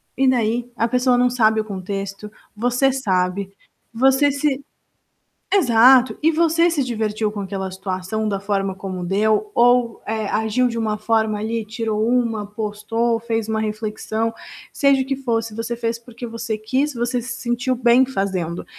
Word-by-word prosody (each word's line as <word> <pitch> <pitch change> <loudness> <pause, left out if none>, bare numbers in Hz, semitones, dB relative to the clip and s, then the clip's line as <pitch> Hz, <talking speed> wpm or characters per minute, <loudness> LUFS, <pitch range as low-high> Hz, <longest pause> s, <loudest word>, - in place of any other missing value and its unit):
e 270 +1 +2
daí? 240 0 0
A 230 - +1
pessoa 250 +1 +2
não 250 0 +3
sabe 220 -3 +3
o 215 - -2
contexto, 195 +1 -5 0.2
você 245 +4 +2
sabe. 190 -5 -1 0.4
Você 265 +4 +4
se 280 -1 -1 0.9
exato! 255 - +5
E 325 - +5
você 335 +1 +3
se 310 -4 0
divertiu 220 -3 -1
com 205 -1 -5
aquela 190 0 -4
situação 190 +3 -3
da 200 -2 -1
forma 195 -1 -1
como 185 -2 -5
deu, 215 - +1
ou, 245 -1 +3
eh, 220 -1 -2
agiu 220 +3 +1
de 230 - -4
uma 215 -2 -1
forma 220 -1 0
ali, 225 0 -2
tirou 220 0 -2
uma, 230 -4 +1
postou, 220 +2 -2
fez 225 -1 -2
uma 220 0 0
reflexão. 220 +1 -3 0.4
Seja 275 -2 +3
o - - -12
que 275 0 -1
fosse, 225 -4 -2
você 230 +1 -3
fez 230 0 -2
porque 240 0 -9
você 230 -1 -4
quis, 265 +7 -1
você 240 +1 -1
se 235 0 -5
sentiu 245 +2 -1
bem 245 +1 +4
fazendo. 190 -8 -3
225 Hz, 165 wpm, -21 LUFS, 210-250 Hz, 0.9 s, exato